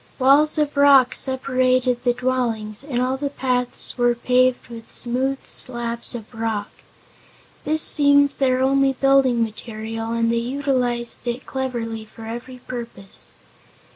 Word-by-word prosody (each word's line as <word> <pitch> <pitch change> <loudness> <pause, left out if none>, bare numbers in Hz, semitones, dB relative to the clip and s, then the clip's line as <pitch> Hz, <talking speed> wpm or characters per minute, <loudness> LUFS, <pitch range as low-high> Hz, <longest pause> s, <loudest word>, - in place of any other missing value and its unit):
Walls 285 +4 +4
of 300 -1 0
rock 280 -3 +6
separated 255 -2 +1
the 245 -1 +2
dwellings, 235 -4 -2
and 270 -4 -3
all 255 +1 0
the 285 +1 -3
paths 250 -2 -2
were 240 0 +3
paved 250 +1 +1
with 230 -1 -11
smooth 260 +3 0
slabs 235 -1 -5
of 225 0 -9
rock. 220 -2 -3 0.9
This 310 +1 +2
seemed 285 -1 +5
their 260 -2 0
only 270 0 +3
building 265 -3 +3
material 225 0 -6
and 230 0 +1
they 235 - 0
utilized 245 -1 0
it 240 +2 -3
cleverly 235 -4 -4
for 220 +1 -13
every 240 +3 -7
purpose. 230 -6 -6
250 Hz, 135 wpm, -21 LUFS, 235-265 Hz, 0.9 s, rock